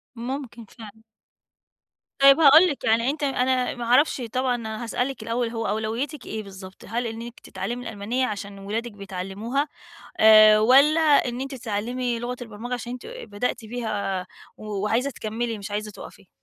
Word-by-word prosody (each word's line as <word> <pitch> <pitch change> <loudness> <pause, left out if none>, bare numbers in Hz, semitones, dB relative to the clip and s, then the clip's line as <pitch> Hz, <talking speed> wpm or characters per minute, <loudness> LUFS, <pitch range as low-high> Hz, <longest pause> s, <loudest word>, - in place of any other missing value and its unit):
ممكن 240 -1 -6
فعلًا. 220 +1 -14 1.2
طيب 275 +2 +7
هاقول 315 +4 +8
لِك، 285 - -4
يعني 230 +3 +2
أنتِ 295 +1 -3
أنا 255 -2 0
ما 240 - -6
اعرفش 260 +3 +3
طبعًا 255 -1 +1
أنا 220 -1 -5
هاسألِك 245 +1 -3
الأول، 230 +1 -1
هو 225 -1 -3
أولويّتِك 230 +7 -3
إيه 215 -1 -5
بالضبط؟ 190 -1 -12
هل 235 +3 -2
إنِّك 230 +1 -8
تتعلمي 230 +6 -5
الألمانية 225 +5 -2
عشان 200 -1 -6
اولادِك 220 +4 -4
بيتعلموها 200 +7 -4 0.5
آآ، 215 -1 +8
والّا 275 +8 +5
إن 280 -6 +3
أنتِ 270 +1 -5
تتعلّمي 240 +1 -3
لغة 245 +1 -4
البرمجة 230 +2 -6
عشان 245 0 -6
أنتِ 250 - -8
بدأتِ 250 - -4
فيها 210 -5 -3 0.3
و 215 - -11 0.2
وعايزة 240 +6 +1
تكمّلي 225 0 -4
مش 200 0 -8
عايزة 210 +1 -3
تُقَفي؟ 200 -1 -13
235 Hz, 155 wpm, -24 LUFS, 215-255 Hz, 1.2 s, هاقول